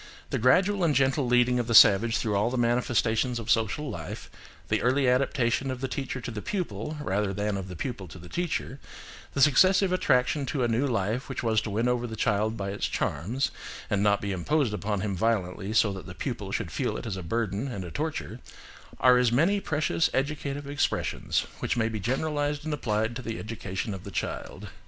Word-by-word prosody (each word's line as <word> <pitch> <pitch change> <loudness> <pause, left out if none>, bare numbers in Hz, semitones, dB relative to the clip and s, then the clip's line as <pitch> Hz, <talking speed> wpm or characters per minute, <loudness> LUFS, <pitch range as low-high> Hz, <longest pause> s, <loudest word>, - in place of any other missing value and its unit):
The - - 0
gradual 185 - +3
and 155 -4 +2
gentle 135 0 +2
leading 125 0 +3
of 120 - -2
the 115 - +1
savage 110 +3 +7
through 105 -3 -1
all 105 +3 +2
the 130 - -2
manifestations 120 0 +1
of 115 -1 -2
social 115 +7 +1
life, 80 -10 -7 0.4
the - - +1
early 130 +2 +2
adaptation 130 0 +1
of 130 -1 -3
the 135 - -2
teacher 135 0 -4
to 120 - -5
the 105 -2 -5
pupil 155 - -3
rather 100 -7 -1
than 105 0 -1
of 95 -1 -4
the 90 - -8
pupil 100 -1 -5
to 80 - -11
the 90 - -11
teacher, 160 - -3 0.6
the 140 - +1
successive 185 +7 +5
attraction 140 -4 +2
to 135 -2 -1
a - - +2
new 120 +5 +1
life 110 +2 -1
which 135 - -4
was 110 -2 +2
to 110 - -5
win 110 +4 0
over 120 0 0
the 110 - -6
child 110 +1 0
by 100 -1 -3
its 100 - -2
charms, 110 - -1 0.4
and 100 -2 +2
not 100 0 +3
be 100 - -2
imposed 120 - 0
upon 105 -1 -2
him 100 -1 -2
violently 95 -1 -1
so 110 -2 +3
that 95 -4 -8
the - - -9
pupil - - -4
should - - -2
feel - - -1
it - - -7
as 105 -4 -3
a 95 - -5
burden 110 +5 -2
and 100 -8 -5
a 85 - -8
torture, 150 - -4 0.6
are 125 0 +6
as 125 -2 +3
many 170 +11 +3
precious 155 -1 0
educative 140 0 -2
expressions 145 +1 -1
which - - -1
may 110 -1 +2
be 110 -1 -3
generalised 145 +6 -1
and 155 - -2
applied 110 -4 -1
to 130 - -4
the 115 -2 -5
education 105 -2 -4
of 95 +1 -8
children. 80 - -4
120 Hz, 205 wpm, -27 LUFS, 105-135 Hz, 0.6 s, savage